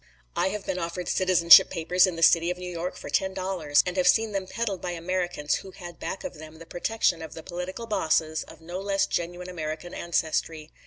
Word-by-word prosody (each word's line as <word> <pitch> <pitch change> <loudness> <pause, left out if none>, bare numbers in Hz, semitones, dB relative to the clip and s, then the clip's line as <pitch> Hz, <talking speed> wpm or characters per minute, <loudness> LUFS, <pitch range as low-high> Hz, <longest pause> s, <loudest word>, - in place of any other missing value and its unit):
I - - +1
have 205 +1 -4
been 185 - -2
offered 170 +1 -4
citizenship 180 -2 +7
papers 180 +2 +3
in 180 - -3
the 165 - -2
city 170 +1 +5
of 180 - -2
New 180 0 -6
York 175 +1 -4
for - - -9
ten 190 0 0
dollars; 185 -6 +1
and 180 +1 -3
have 180 -1 +2
seen 220 +3 +4
them 195 -2 -3
peddled 210 -5 -3
by 175 - -3
Americans 175 -3 -1
who 195 - -10
had 175 -2 -11
back 195 - -5
of 155 - -7
them 155 0 -11
the 165 - -12
protection 175 0 0
of 160 - -8
political 180 +6 -5
bosses 160 -6 0
of - - -15
no 175 +3 -6
less 195 0 +1
genuine 175 +1 -3
American 160 -1 -5
ancestry. 160 -2 -2
175 Hz, 210 wpm, -26 LUFS, 165-185 Hz, -, citizenship